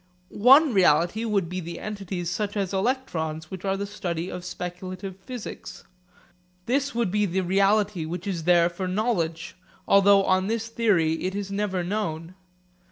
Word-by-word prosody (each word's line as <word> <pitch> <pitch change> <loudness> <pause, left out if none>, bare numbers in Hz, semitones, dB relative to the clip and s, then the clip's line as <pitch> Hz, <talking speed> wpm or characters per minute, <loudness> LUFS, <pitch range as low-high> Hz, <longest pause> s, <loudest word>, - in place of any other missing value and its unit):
One 270 +6 +6
reality 180 +4 +3
would 200 -5 0
be 180 +2 -4
the 170 -1 -7
entities 195 -4 -5
such 205 +3 -2
as 195 -1 -2
electrons 175 - -2
which 190 -1 -7
are 195 0 0
the 200 - -3
study 180 -4 -4
of 180 - -6
speculative 185 +1 -6
physics. 225 +4 -8 0.8
This 275 +1 0
would 235 -6 0
be 210 0 +1
the 190 +2 -1
reality 195 -1 +2
which 175 +3 -5
is 175 -5 -3
there 175 -1 +5
for 175 +2 -4
knowledge; 180 -5 -1 0.3
although 200 0 +6
on 185 0 +2
this 225 +1 -2
theory 185 -9 +1
it 190 +1 -2
is 200 -1 -4
never 200 -3 -1
known. 170 -3 -3
190 Hz, 160 wpm, -25 LUFS, 175-210 Hz, 0.8 s, One